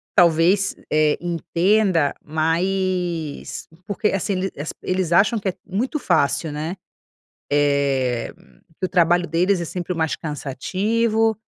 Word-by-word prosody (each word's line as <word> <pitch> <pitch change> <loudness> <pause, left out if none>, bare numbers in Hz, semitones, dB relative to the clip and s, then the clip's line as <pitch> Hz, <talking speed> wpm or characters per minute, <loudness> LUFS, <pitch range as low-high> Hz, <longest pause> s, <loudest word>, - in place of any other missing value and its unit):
talvez, 175 +3 +4 0.2
eh, 155 -1 +3
entenda, 175 0 +1
mas 170 0 -1 0.2
porque, 210 +1 -1
assim 195 +1 -1
ele 190 +1 -2
as 145 +3 -4
eles 185 -2 -1
acham 200 +6 +4
que 195 -2 -1
é - - -3
muito 240 - -2
fácil, 150 - +1
né, 155 +4 -4 0.8
eh, 140 -4 +1 0.5
que 185 - 0
o - - -4
trabalho 175 0 +3
deles 180 +4 +2
é - - -3
sempre 180 +1 -4
o - - -7
mais 160 -1 0
cansativo, 215 - 0
175 Hz, 130 wpm, -22 LUFS, 155-195 Hz, 0.8 s, talvez